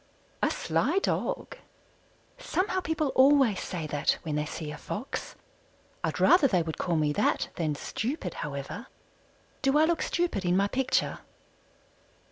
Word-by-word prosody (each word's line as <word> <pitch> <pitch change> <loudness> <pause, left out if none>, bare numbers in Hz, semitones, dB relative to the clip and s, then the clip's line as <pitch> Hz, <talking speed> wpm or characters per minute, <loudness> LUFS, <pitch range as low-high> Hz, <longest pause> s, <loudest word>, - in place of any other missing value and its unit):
"A - - +3
sly - - 0
dog." 390 - -1 0.8
Somehow 375 -5 0
people 320 -4 -1
always 265 -6 +5
say 170 -4 -4
that 145 -1 +1
when 155 -3 -2
they 150 0 -1
see 155 -1 -5
a 150 - -7
Fox. 240 +6 -5 0.7
I'd - - -1
rather 350 -5 +6
they 180 -8 +2
would 160 -1 -5
call 175 - 0
me 150 -2 +2
that - - +1
than 155 -3 -1
stupid, 220 - -3
however. 145 - -5 0.7
Do 270 0 +3
I 310 - +6
look 335 0 +1
stupid 345 - 0
in 180 0 +2
my 200 +1 +3
picture? 260 +4 0
200 Hz, 145 wpm, -28 LUFS, -, 0.8 s, rather